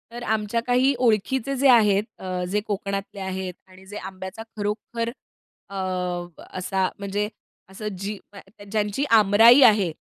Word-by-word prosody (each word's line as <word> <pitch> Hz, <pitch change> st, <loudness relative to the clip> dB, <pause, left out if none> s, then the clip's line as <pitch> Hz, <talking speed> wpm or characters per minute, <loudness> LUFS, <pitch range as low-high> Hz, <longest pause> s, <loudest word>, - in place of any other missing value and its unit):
तर 240 Hz, +1 st, -7 dB
आमच्या 220 Hz, +1 st, 0 dB
काही 255 Hz, +3 st, +3 dB
ओळखीचे 250 Hz, +3 st, +1 dB
जे 275 Hz, +2 st, +3 dB
आहेत 210 Hz, -5 st, +5 dB, 0.2 s
अ, 185 Hz, -1 st, -3 dB
जे 195 Hz, +4 st, 0 dB
कोकणातले 200 Hz, -1 st, -4 dB
आहेत 190 Hz, -1 st, -4 dB
आणि 185 Hz, 0 st, -17 dB
जे 205 Hz, +2 st, -8 dB
आंब्याचा 190 Hz, +2 st, -7 dB
खरोखर 215 Hz, +3 st, -3 dB, 0.6 s
अ, 200 Hz, -, -9 dB, 0.8 s
असा 190 Hz, 0 st, 0 dB
म्हणजे 200 Hz, +1 st, -2 dB, 0.4 s
असं 200 Hz, +3 st, -7 dB
जी 200 Hz, +2 st, -4 dB, 0.5 s
ज्यांची 210 Hz, +4 st, 0 dB
आंबराई 225 Hz, +4 st, +7 dB
आहे 205 Hz, -7 st, +5 dB
205 Hz, 130 wpm, -24 LUFS, 190-230 Hz, 0.8 s, आंबराई